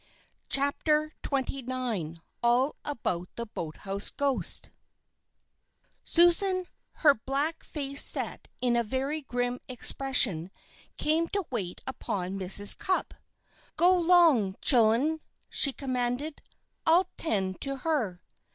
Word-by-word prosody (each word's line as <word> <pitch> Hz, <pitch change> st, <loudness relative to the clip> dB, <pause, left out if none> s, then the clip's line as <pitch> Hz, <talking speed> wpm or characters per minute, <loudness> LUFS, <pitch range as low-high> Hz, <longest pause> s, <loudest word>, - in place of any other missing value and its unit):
CHAPTER 300 Hz, +2 st, +1 dB
XXIX 255 Hz, -, -3 dB, 0.2 s
ALL 245 Hz, +4 st, +2 dB
ABOUT 180 Hz, -11 st, -3 dB
THE 235 Hz, -, -5 dB
BOATHOUSE 195 Hz, +1 st, -3 dB
GHOST 280 Hz, -2 st, 0 dB, 1.3 s
Susan, 365 Hz, +2 st, +3 dB, 0.4 s
her 290 Hz, -, +8 dB
black 280 Hz, +7 st, -3 dB
face 280 Hz, -2 st, 0 dB
set -, -, +3 dB
in 245 Hz, -1 st, +1 dB
a 235 Hz, -, +2 dB
very 270 Hz, +7 st, -3 dB
grim 245 Hz, -2 st, -3 dB
expression, 250 Hz, -8 st, +1 dB, 0.5 s
came 320 Hz, +2 st, +1 dB
to 400 Hz, +1 st, -3 dB
wait 190 Hz, -8 st, -4 dB
upon 195 Hz, -7 st, -4 dB
Mrs. 195 Hz, +2 st, +4 dB
Cupp. 375 Hz, -, -2 dB, 0.6 s
"Go 360 Hz, +2 st, +5 dB
'long, 330 Hz, -, +4 dB
chillen," 250 Hz, +6 st, +4 dB, 0.3 s
she 275 Hz, -, +4 dB
commanded, 255 Hz, +2 st, -3 dB, 0.5 s
"I'll 355 Hz, +3 st, +4 dB
'tend 190 Hz, -, -2 dB
to 275 Hz, 0 st, +2 dB
her." 230 Hz, -, -2 dB
265 Hz, 105 wpm, -27 LUFS, 220-305 Hz, 1.3 s, her